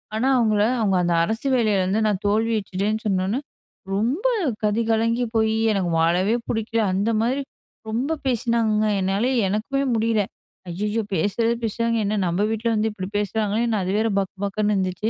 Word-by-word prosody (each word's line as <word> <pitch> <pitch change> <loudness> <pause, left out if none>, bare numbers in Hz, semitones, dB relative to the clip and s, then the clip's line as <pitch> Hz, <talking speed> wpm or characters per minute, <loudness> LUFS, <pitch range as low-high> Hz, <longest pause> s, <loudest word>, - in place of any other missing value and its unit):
ஆனா 230 +4 +1
அவுங்கள 215 -3 +2 0.2
அவுங்க 200 -4 +2
அந்த 175 0 +1
அரசு 225 +9 -2
வேலைல 215 -5 +2
வந்து 195 +4 +1
நான் 205 -2 0
தோல்வியுற்றுடேன்னு 215 -1 0
சொன்னோனே, 195 +4 0 0.6
ரொம்ப 245 - -1 0.4
கதி 210 +2 +1
கலங்கி 230 +2 +1
போயி, 220 0 +2 0.2
எனக்கு 185 -4 -1
வாழவே 180 +6 +2 0.2
புடிக்கல 225 0 -1
அந்த 200 +4 +1
மாரி, 255 +5 0 0.5
ரொம்ப 265 +9 -1
பேசினாங்கங்க. 230 -3 +1
என்னால 195 +5 +1 0.2
எனக்குமே 235 +8 -1
முடியல. 220 -1 +1 0.5
ஐய்யய்யோ! 210 +6 -1
பேசுறது 205 +6 +1
பேசுறாங்க, 230 +1 0
என்ன 210 +1 0
நம்ப 175 +3 0
வீட்ல 225 +1 -2
வந்து 215 +1 +1
இப்டி 190 -3 -6
பேசுறாங்களேன் 215 +2 0
அது 185 0 -2
வேற 220 +1 +2
பக் 195 -1 -3
பக்குன்னு 210 +1 0
இருந்துச்சு. 190 +3 -1
215 Hz, 150 wpm, -23 LUFS, 200-230 Hz, 0.6 s, அவுங்கள